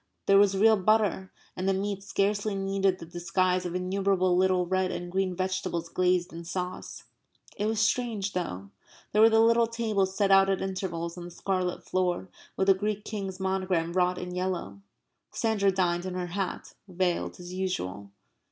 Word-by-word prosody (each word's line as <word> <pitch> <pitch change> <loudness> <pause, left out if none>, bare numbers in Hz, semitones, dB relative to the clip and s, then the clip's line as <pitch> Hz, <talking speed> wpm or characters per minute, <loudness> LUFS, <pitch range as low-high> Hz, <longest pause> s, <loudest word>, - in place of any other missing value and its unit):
There 195 0 +6
was 200 -1 +4
real 220 +2 +5
butter. 200 -2 +1 0.2
And 185 +1 -1
the 195 - +2
meat 200 0 -2
scarcely 205 +1 0
needed 195 -1 +1
the 165 - -9
disguise 180 +2 0
of 175 - -5
innumerable 185 0 +1
little 185 0 +3
red 185 +1 0
and 175 -1 -5
green 190 -1 0
vegetables 185 -2 -2
glazed 180 0 +1
in 170 +1 -7
sauce. 180 +2 -5 0.5
It 210 - -1
was 220 -1 0
strange, 220 -3 0
though. 100 - -4 0.4
There 210 - +3
were 225 - +8
the 225 0 +4
little 230 +1 +4
tables 215 -5 -1
set 200 -2 +2
out 195 0 +6
at 195 - +1
intervals 180 -3 -4
on 175 - -7
the - - -8
scarlet 180 0 -2
floor 185 0 -1 0.3
with 190 - +2
the 195 - +6
Greek 210 +2 -3
King's 195 -3 -5
monogram 185 -3 -1
wrought 180 0 +2
in 180 0 -5
yellow. 180 - -3 0.5
Sandra 210 -3 +1
dined 180 -1 0
in 185 - -5
her 180 -1 -2
hat, 195 -1 -4
veiled 180 -1 -1
as 180 0 -8
usual. 100 - -3
190 Hz, 175 wpm, -28 LUFS, 180-195 Hz, 0.5 s, were